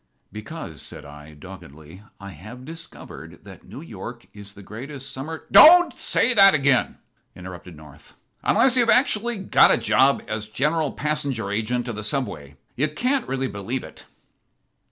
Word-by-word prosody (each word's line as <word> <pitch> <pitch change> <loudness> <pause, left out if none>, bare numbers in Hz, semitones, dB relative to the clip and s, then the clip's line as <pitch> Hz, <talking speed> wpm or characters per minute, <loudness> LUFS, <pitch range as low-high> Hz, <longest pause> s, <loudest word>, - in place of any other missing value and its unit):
"Because," 105 - -9
said - - -9
I, 75 +1 -13
doggedly, 80 0 -13 0.2
"I 100 -1 -10
have 110 +10 -12
discovered 165 +2 -11
that - - -14
New - - -10
York - - -10
is 100 -1 -12
the 100 - -14
greatest 135 +6 -9
summer 155 +5 -7
" - - -30
"Don't 350 +2 +8
say 255 - +1
that 195 -4 +6
again," 140 -3 +1 0.4
interrupted 90 -2 -11
North, 75 -1 -17 0.3
"unless 260 -1 +3
you've 240 -2 +2
actually 240 -2 +2
got 190 - +4
a - - +3
job 135 +2 +2
as 110 0 -5
General 150 +6 -1
Passenger 140 -9 -3
Agent 120 +4 -2
of 120 - -5
the 105 - -6
Subway. 90 - -4 0.2
You 145 +4 0
can't 250 - -2
really 135 0 -2
believe 110 +4 -5
it." - - -14
125 Hz, 155 wpm, -22 LUFS, 95-155 Hz, 0.4 s, Don't